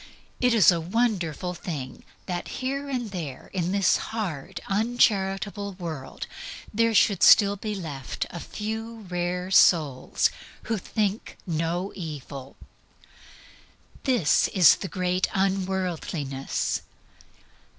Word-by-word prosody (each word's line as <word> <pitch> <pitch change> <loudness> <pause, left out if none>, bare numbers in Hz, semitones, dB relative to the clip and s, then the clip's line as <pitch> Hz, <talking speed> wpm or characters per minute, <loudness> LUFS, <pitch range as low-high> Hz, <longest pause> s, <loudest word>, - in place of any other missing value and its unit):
It 250 -2 +3
is 205 -4 +7
a 170 -2 0
wonderful 180 - -1
thing 150 -7 -6 0.2
that 175 -2 -3 0.2
here 275 +2 -2
and 245 -6 -3
there 155 -9 -6
in 180 -2 -1
this 195 -2 +3
hard, 185 -5 -4
uncharitable 200 -2 +1
world 165 -7 -6 0.5
there 230 +1 +2
should 200 -1 +4
still 200 -1 +7
be 210 +1 -4
left 145 -8 -4
a 170 - -6
few 220 +4 -5
rare 180 +1 -2
souls 155 -8 +4 0.3
who 220 -2 -1
think 210 +2 -2
no 170 +3 -2
evil. 140 -5 -7 1.5
This 245 - +3
is 180 -4 +6
the 195 - -5
great 185 -1 0
unworldliness. 185 -7 -1
185 Hz, 110 wpm, -26 LUFS, 165-210 Hz, 1.5 s, is